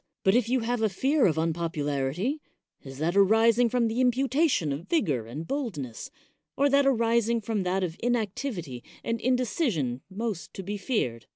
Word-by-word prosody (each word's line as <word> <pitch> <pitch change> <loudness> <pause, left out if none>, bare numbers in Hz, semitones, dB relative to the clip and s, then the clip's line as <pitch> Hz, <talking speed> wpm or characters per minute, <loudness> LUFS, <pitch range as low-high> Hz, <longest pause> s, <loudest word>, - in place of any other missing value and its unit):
But 190 - +4
if 235 -1 +2
you 255 0 +2
have 240 0 -1
a 220 - +3
fear 270 - +2
of 160 -3 0
unpopularity, 160 - -1 0.4
is 135 -1 -10
that 165 +5 -1
ari 220 +4 +5
sing 235 +1 +2
from 240 -1 +1
the 225 +3 -1
imputation 255 - +2
of 155 +6 -7
vigor 145 - 0
and 145 +8 -6
boldness, 165 - -4 0.5
or 280 +1 +3
that 280 0 +4
arising 235 -2 +2
from 220 -1 -2
that 185 +1 0
of 170 -2 -3
inactivity 215 - -2 0.2
and 230 -1 -2
inde 255 +1 +2
cision 170 - -1
most 205 -2 -5
to 195 - -6
be 205 +3 -4
feared? 125 - -2
215 Hz, 175 wpm, -27 LUFS, 160-245 Hz, 0.5 s, ari